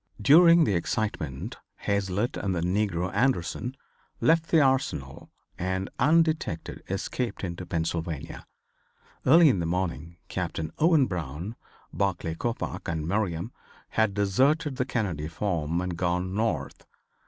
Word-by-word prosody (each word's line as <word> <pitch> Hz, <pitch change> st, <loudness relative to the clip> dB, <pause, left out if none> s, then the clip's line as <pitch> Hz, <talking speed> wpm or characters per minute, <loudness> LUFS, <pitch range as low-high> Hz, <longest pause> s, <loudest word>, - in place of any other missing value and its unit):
During 165 Hz, -, +7 dB
the 105 Hz, -, +1 dB
excitement 85 Hz, -6 st, -2 dB, 0.2 s
Hazlitt 100 Hz, +4 st, -1 dB
and 95 Hz, -2 st, -2 dB
the 85 Hz, -, -1 dB
negro 90 Hz, 0 st, 0 dB
Anderson 125 Hz, +1 st, 0 dB, 0.4 s
left 165 Hz, 0 st, +3 dB
the 165 Hz, -, +5 dB
Arsenal 130 Hz, -, 0 dB, 0.3 s
and, 95 Hz, +1 st, -2 dB
undetected, 155 Hz, -, +1 dB
escaped 100 Hz, +3 st, -3 dB
into 90 Hz, 0 st, -5 dB
Pennsylvania. 80 Hz, -2 st, -3 dB, 0.8 s
Early 165 Hz, +5 st, +8 dB
in 120 Hz, -10 st, +3 dB
the 85 Hz, -, -1 dB
morning 85 Hz, -2 st, -3 dB
Captain 85 Hz, -4 st, -3 dB
Owen 160 Hz, -3 st, +5 dB
Brown, 85 Hz, -, -5 dB, 0.4 s
Barclay 90 Hz, -4 st, -1 dB
Coppoc 115 Hz, +8 st, -4 dB
and 80 Hz, -2 st, -2 dB
Merriam 95 Hz, 0 st, -1 dB, 0.4 s
had 110 Hz, -3 st, +1 dB
deserted 130 Hz, -, +2 dB
the 125 Hz, -, 0 dB
Kennedy 95 Hz, -, -2 dB
farm 85 Hz, -2 st, -1 dB
and 90 Hz, -1 st, -3 dB
gone 90 Hz, +2 st, -1 dB
north. 95 Hz, -10 st, -2 dB
95 Hz, 120 wpm, -27 LUFS, 85-125 Hz, 0.8 s, Early